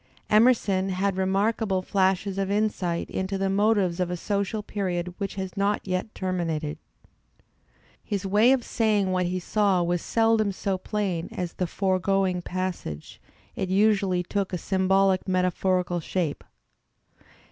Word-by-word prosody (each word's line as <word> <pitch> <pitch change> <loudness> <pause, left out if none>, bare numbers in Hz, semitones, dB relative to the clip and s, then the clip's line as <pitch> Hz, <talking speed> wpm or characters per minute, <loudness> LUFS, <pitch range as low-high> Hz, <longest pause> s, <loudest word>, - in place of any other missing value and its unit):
Emerson 210 -4 +4
had 190 +1 0
remarkable 195 +1 0
flashes 190 0 +1
of 195 -1 -1
insight 200 -5 0
into 190 +1 -2
the 195 0 0
motives 200 -3 +2
of 180 -1 0
a 180 - -3
social 200 +3 -2
period 180 -4 -3
which 200 -1 -3
has 190 -2 -5
not 200 +1 +1
yet 185 +3 -2
terminated. 165 -5 -2 1.2
His 200 -2 -3
way 210 +6 +4
of 265 -2 +2
saying 210 -4 +1
what 180 -1 +1
he 185 +1 -2
saw 195 -1 +1
was 175 0 0
seldom 225 -3 +2
so 190 0 -2
plain 185 -4 -2
as 180 -2 -4
the 180 - -2
foregoing 190 0 0
passage; 180 - -5 0.3
it 190 - -2
usually 195 -2 +2
took 195 +2 -2
a 180 - -1
symbolic 190 +1 +2
metaphorical 180 -1 +1
shape. 165 -2 -2
190 Hz, 135 wpm, -26 LUFS, 180-200 Hz, 1.2 s, Emerson